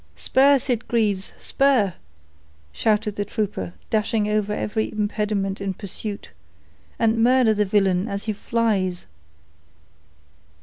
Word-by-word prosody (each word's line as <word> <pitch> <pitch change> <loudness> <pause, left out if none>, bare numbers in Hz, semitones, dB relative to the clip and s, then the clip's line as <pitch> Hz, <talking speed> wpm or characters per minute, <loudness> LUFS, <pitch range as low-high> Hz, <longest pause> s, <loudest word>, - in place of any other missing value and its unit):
"Spur, 275 +2 +4
Sitgreaves—spur," 230 -1 +1 0.8
shouted 210 - 0
the 205 - 0
trooper, 195 - -4 0.2
dashing 215 -1 +1
over 210 -1 0
every 215 +1 -2
impediment 205 -2 -2
in 195 -1 -3
pursuit, 205 +1 -6 0.7
"and 225 0 +2
murder 245 -1 +4
the 210 0 +1
villain 195 -1 +2
as 200 -1 -4
he 215 - -2
flies." 200 -5 -1
210 Hz, 100 wpm, -23 LUFS, 200-225 Hz, 0.8 s, Spur